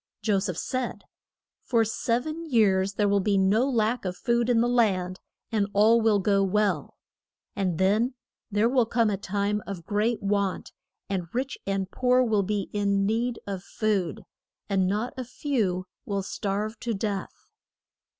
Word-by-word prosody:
Jo 205 -3 +2
seph 185 -3 -3
said, 255 -1 -3 0.6
For 230 -3 +2
sev 230 +3 -1
en 320 +1 -5
years 195 -5 +3
there 205 0 +1
will 200 0 +3
be 200 +1 +1
no 210 +7 +3
lack 235 -1 +1
of 180 -1 -4
food 235 0 +1
in 240 -2 +4
the 235 - +3
land, 190 -7 +1 0.3
and 210 -3 +1
all 220 +3 +5
will 220 -2 +4
go 200 0 +2
well; 195 -5 0 0.6
and 185 -4 -1
then 215 +8 +2 0.3
there 210 +2 +2
will 245 -2 +2
come 230 -2 +2
a - - +1
time 205 +2 -1
of 180 -4 -6
great 215 +4 0
want, 200 -1 -1 0.4
and 185 -3 -2
rich 265 +2 -1
and 195 -1 -1
poor 250 0 +3
will 220 -4 +2
be 200 0 -2
in 200 -1 +1
need 230 +3 0
of 195 -2 -4
food, 195 -9 -1 0.4
and 190 -2 +1
not 210 +6 -1
a 255 - -3
few 225 -8 -1 0.2
will 200 -1 -2
starve 205 +3 -3
to 230 -2 -2
death. 200 -1 -4
210 Hz, 165 wpm, -26 LUFS, 195-235 Hz, 0.6 s, all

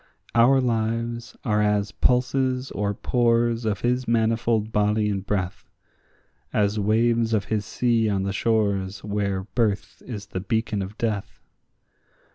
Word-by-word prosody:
Our 120 +3 +5
lives 115 -1 -2
are 105 -3 +2
as 105 0 +1
pulses 130 +2 +1
or 100 0 -1
pores 120 -1 +1
of 105 -2 -1
his 125 +1 0
manifold 115 -1 +1
body 105 0 +2
and 95 -1 -2
breath; 100 -2 -3 0.8
As 105 0 +1
waves 115 +2 +2
of 100 - 0
his 105 -2 -2
sea 115 -3 +1
on 95 -2 0
the 100 0 -2
shores 100 -3 0
where 100 -2 -1
birth 105 -1 -2
is 105 -5 -7
the 95 - -1
beacon 110 +1 -1
of 95 +3 -6
death. 105 -4 -3
110 Hz, 135 wpm, -24 LUFS, 100-115 Hz, 0.8 s, Our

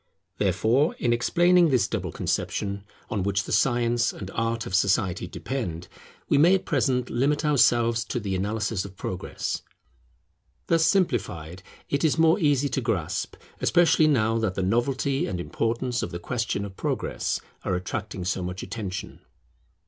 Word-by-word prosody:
Therefore, 130 +8 +2
in 120 -1 +1
explaining 175 +8 +4
this 130 -4 +2
double - - -3
conception 100 -1 -2 0.3
on 105 - 0
which 100 +1 0
the - - -7
Science 120 -2 +2
and 95 -1 -8
Art 115 +1 -1
of - - -7
society 95 -2 +1
depend, 90 -6 -4 0.4
we 140 - +3
may 175 +6 +6
at 190 - -2
present 125 -2 0
limit 145 +5 +1
ourselves 120 -5 +3
to 120 - -3
the 100 -3 -3
analysis 105 +1 -1
of 95 -1 -10
Progress. 95 0 -4 1.0
Thus 165 -1 +3
simplified 95 - 0 0.3
it 140 - -1
is 160 -1 +2
more 165 +3 +4
easy 145 -4 +2
to 135 - -1
grasp, 105 -10 -2 0.2
especially 170 -2 +4
now 115 -6 +2
that 105 -4 -1
the 95 - -1
novelty 130 +6 0
and 95 -4 -3
importance 120 +6 -1
of - - -3
the 85 - -5
question 110 +1 -2
of 95 -1 -9
Progress - - -2 0.2
are 90 - 0
attracting 90 0 -4
so 95 +1 -1
much 90 +1 -5
attention. 95 -2 -6
115 Hz, 155 wpm, -26 LUFS, 95-135 Hz, 1.0 s, may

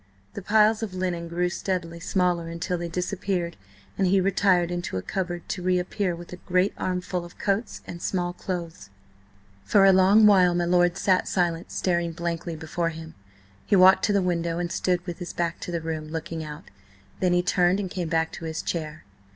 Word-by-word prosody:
The - - -6
piles 215 +2 +3
of 205 -5 -4
linen 180 -2 -2
grew 175 +1 0
steadily 175 -2 -3
smaller 175 -1 0
until 170 +2 -3
they 175 0 -3
disappeared, 180 0 -2 0.4
and 190 - +3
he 190 +2 +4
retired 185 -2 +2
into 175 - -3
a 90 - -4
cupboard 175 -2 -4
to 185 - -3
reappear 180 +1 0
with 175 +1 -10
a - - -7
great 180 +2 +1
armful 180 -1 -2
of 175 - -13
coats 200 +3 -2
and 170 - -8
small 175 -2 -1
clothes. 170 - -6 0.7
For 200 -2 +4
a 195 - +7
long 195 +4 +6
while 185 -4 +5
my 175 0 +1
lord 175 0 +3
sat 185 -1 +2
silent 170 -1 -1
staring 170 -2 0
blankly 170 0 -3
before 165 +2 -2
him. 160 0 -9 0.5
He - - +2
walked 190 0 +7
to - - +1
the 200 -2 +2
window 170 -2 -1
and 175 -1 -2
stood 180 0 0
with 175 -2 -6
his 175 - -6
back 170 -1 -2
to - - -6
the 170 -1 -2
room, 160 -1 -4
looking 160 0 -5
out, 150 +2 -9 0.5
then 180 -1 +2
he 175 0 +2
turned 180 +1 +2
and 200 - -2
came 175 -3 -3
back 160 0 +1
to 165 - -8
his 160 0 -4
chair. 155 -2 -4
175 Hz, 195 wpm, -25 LUFS, 170-185 Hz, 0.7 s, a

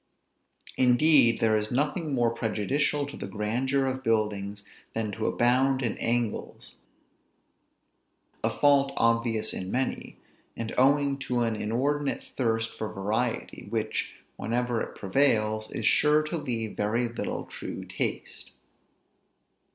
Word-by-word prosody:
Indeed, 125 -1 +5
there 110 -1 +4
is 105 0 -1
nothing 150 +5 -1
more 120 -2 +2
prejudicial 120 +6 0
to 145 - -9
the - - -6
grandeur 125 +6 0
of 130 0 -2
buildings 105 -3 -1 0.3
than 110 -2 -1
to 110 +2 -2
abound 130 +2 +2
in 115 - -1
angles; 115 -2 -2 1.7
a - - +3
fault 140 -1 +3
obvious 115 -1 +1
in 95 - -5
many; 130 +5 -2 0.4
and 115 -1 -4
owing 140 +1 +3
to 125 -2 -1
an 115 -2 +1
inordinate 135 +7 -1
thirst 115 -3 0
for 110 -1 -4
variety, 110 +4 -2
which, - - -2 0.2
whenever 120 0 -1
it - - -5
prevails, 110 -1 +1
is - - -4
sure 150 +1 +4
to 155 +3 -3
leave 120 -8 -3
very 115 +4 0
little 115 0 -4
true - - -7
taste. - - -4
120 Hz, 125 wpm, -27 LUFS, 110-135 Hz, 1.7 s, Indeed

